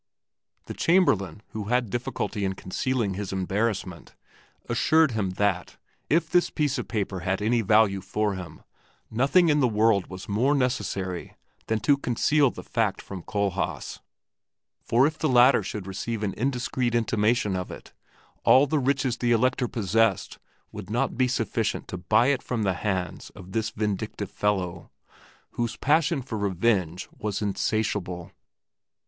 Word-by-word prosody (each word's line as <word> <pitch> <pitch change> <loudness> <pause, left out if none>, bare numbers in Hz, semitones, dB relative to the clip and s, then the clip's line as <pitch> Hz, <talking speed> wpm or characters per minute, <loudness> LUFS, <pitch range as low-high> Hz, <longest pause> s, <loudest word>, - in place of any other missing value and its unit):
The - - -6
Chamberlain, 105 - +2
who 105 -1 -5
had 120 -1 0
difficulty 120 -3 -3
in 95 0 0
concealing 105 +3 -2
his 100 0 -5
embarrassment, 95 -1 -2 0.5
assured 160 -3 +3
him 110 -4 -1
that, 100 -3 0 0.3
if 165 +1 +2
this 175 +2 +2
piece 145 -4 -1
of 125 - -5
paper 100 -4 -2
had 95 +3 -1
any 115 +3 +2
value 105 -2 +3
for 105 +2 -1
him, 90 -5 -8 0.5
nothing 140 +10 +3
in 150 -1 +3
the 130 - +4
world 105 -3 +2
was 95 0 -9
more 125 +8 +2
necessary 100 -9 -2 0.3
than 110 -1 0
to 140 +5 +4
conceal 140 +2 +2
the - - -9
fact 115 -5 -1
from 95 -2 -8
Kohlhaas, 100 -1 -2 0.8
for 120 +3 +3
if 155 +1 -1
the 155 - +1
latter 125 0 +6
should 100 0 -5
receive 105 +3 -4
an 100 -2 -1
indiscreet 125 -1 -1
intimation 110 -2 +1
of 90 -1 -4
it, - - -11 0.5
all 135 +2 +6
the 150 +2 0
riches 135 -2 0
the 120 -1 0
Elector 125 +2 +2
possessed 115 -2 0 0.3
would - - -8
not 120 +5 0
be 130 0 +2
sufficient 115 -4 -1
to - - -4
buy 110 +7 +3
it 140 -3 +1
from 120 -3 -2
the 95 -2 +1
hands 95 -1 -3
of 95 -1 -11
this 110 0 -1
vindictive 105 -2 -3
fellow, 95 -4 -2 0.6
whose 120 -1 -2
passion 155 0 +2
for 110 -4 -5
revenge 95 -3 0
was 105 -2 -2
insatiable. 100 -4 -2
110 Hz, 150 wpm, -26 LUFS, 95-125 Hz, 0.8 s, latter